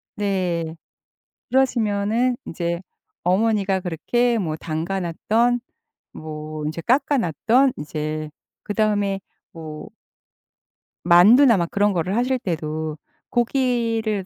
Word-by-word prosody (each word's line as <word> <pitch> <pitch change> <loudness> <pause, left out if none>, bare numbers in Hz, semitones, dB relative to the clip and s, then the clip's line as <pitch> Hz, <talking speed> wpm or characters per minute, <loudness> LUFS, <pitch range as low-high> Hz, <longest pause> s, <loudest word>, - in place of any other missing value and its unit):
네. 180 -5 -1 0.7
그러시면은 235 -2 +1
이제 170 +1 -3 0.4
어머니가 195 +1 +2
그렇게 235 +8 0
뭐 160 -5 -2
담가 165 +5 -3
놨던 225 +8 +1 0.5
뭐 155 -1 -7
이제 155 +2 -4
깎아 275 - +2
놨던 235 - +2
이제 155 0 -4 0.3
그다음에 205 -2 0 0.3
뭐 155 -2 -8 1.2
만두나 215 +8 +7
막 170 -2 -1
그런 205 +1 +2
거를 185 +1 -1
하실 250 +2 +1
때도 155 -5 -3 0.3
고기를 230 -5 0
195 Hz, 205 characters per minute, -22 LUFS, 165-230 Hz, 1.2 s, 만두나